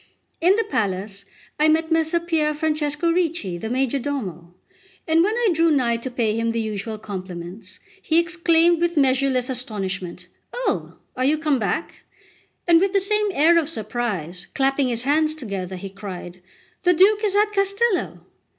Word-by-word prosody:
In 360 +4 +5
the 450 - +1
palace 200 - -3 0.3
I 305 - +4
met 320 +1 +2
Messer 325 +1 +2
Pier 320 -3 0
Francesco 305 +1 0
Ricci, 330 - -1
the 220 - -5
majordomo, 250 - -2 0.6
and 320 +1 +4
when 425 +4 +1
I 475 -2 +2
drew 330 +1 +3
nigh 250 -6 +2
to 235 +3 -6
pay 235 -4 0
him 230 0 -1
the 230 - -1
usual 215 0 -4
compliments, 185 -1 -8 0.2
he 325 -3 +1
exclaimed 340 0 +3
with 345 -1 0
measureless 265 -2 +2
astonishment: 190 -8 -4 0.3
"Oh, - - -2 0.2
are 255 - -1
you 300 +3 +3
come 300 -4 0
back?" 215 - -3 0.7
and 335 -1 +6
with 390 0 +1
the 395 - +4
same 420 +2 +1
air 335 +3 +5
of 310 -2 -2
surprise, 210 - -4
clapping 270 0 +2
his 235 -1 0
hands 305 +3 +2
together, 195 - -5
he 190 +1 -7
cried: 185 -3 -8 0.4
"The 360 -1 +3
Duke 410 +5 +4
is 405 -2 0
at 420 +1 +2
Castello!" 395 +1 0
280 Hz, 160 wpm, -22 LUFS, 210-335 Hz, 0.7 s, and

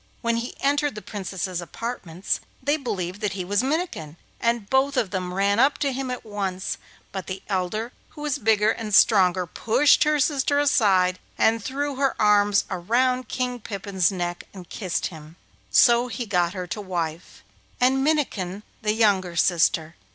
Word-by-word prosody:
When 235 -1 0
he 235 +1 -4
entered 290 -1 +1
the 210 - -6
Princess's 190 -3 -4
apartments 185 -1 -4 0.2
they 285 +3 +1
believed 195 - -4
that 205 -2 -1
he 185 -2 -4
was 205 +3 +1
Minnikin, 265 - -3 0.2
and 235 -3 0
both 270 +3 +2
of 210 -6 0
them 185 -2 -3
ran 200 +3 +1
up 275 +3 +4
to 275 -2 -1
him 265 0 -3
at 250 -2 -5
once; 195 -3 -3 0.3
but 190 -3 -6
the 185 0 -6
elder, 205 +4 -2 0.2
who 295 - -12
was 290 -1 -1
bigger 215 -2 +3
and 215 -3 -2
stronger, 185 -4 +5
pushed 235 - +3
her 300 0 +2
sister 285 0 +1
aside, 195 -10 +3 0.2
and 225 -1 +2
threw 280 +2 -3
her 275 0 0
arms 205 -1 +4
round 250 +8 +1
King 250 -1 -2
Pippin's 200 -3 -1
neck 175 -2 -4
and 180 -2 -10
kissed 185 -5 -2
him; 155 0 -12 0.3
so 240 0 +5
he 245 0 -4
got 180 -4 +1
her 185 -1 -4
to 180 +4 -5
wife, 170 -4 -5 0.4
and 265 +2 +3
Minnikin 210 - -1 0.2
the 210 -1 +1
younger 195 -6 +2
sister. 170 -2 +2
210 Hz, 165 wpm, -24 LUFS, 185-255 Hz, 0.4 s, stronger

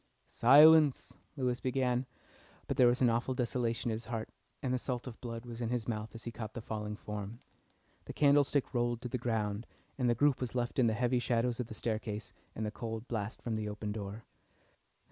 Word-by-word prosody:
"Silence," 150 +3 +6 0.2
Lewis 125 -2 0
began, 130 -1 0 0.6
but 140 - -2
there 130 -2 +6
was 120 +2 +2
an 125 - +5
awful 120 +3 0
desolation 120 -2 -1
at - - 0
his 110 +1 -5
heart 115 -1 -4 0.3
and 130 -2 0
the 130 - +1
salt 125 -1 -3
of 125 -3 -9
blood 115 -1 -6
was 120 0 -7
in 115 - -1
his 120 -2 -1
mouth 110 -2 -4
as 115 - -7
he 120 - -5
caught 110 -1 -7
the - - -3
falling 105 -1 -4
form. 105 +1 -6 0.7
The - - -7
candlestick 145 -1 +3
rolled 120 -1 0
to 125 - -4
the 125 - -2
ground, 110 -2 -1 0.3
and 125 -2 +2
the 120 - +3
group 145 +2 +3
was 125 -1 -3
left 120 +1 -1
in 120 - +5
the 110 - +1
heavy 125 +2 +1
shadows 120 0 0
of 125 - -2
the 110 - -8
staircase 110 -2 -3 0.2
and 110 - -2
the 105 - -2
cold 115 +1 -5
blast 110 0 -4
from 115 -2 -2
the 105 -1 -2
open 105 0 -4
door. 105 +1 -6
120 Hz, 210 wpm, -33 LUFS, 110-125 Hz, 0.7 s, Silence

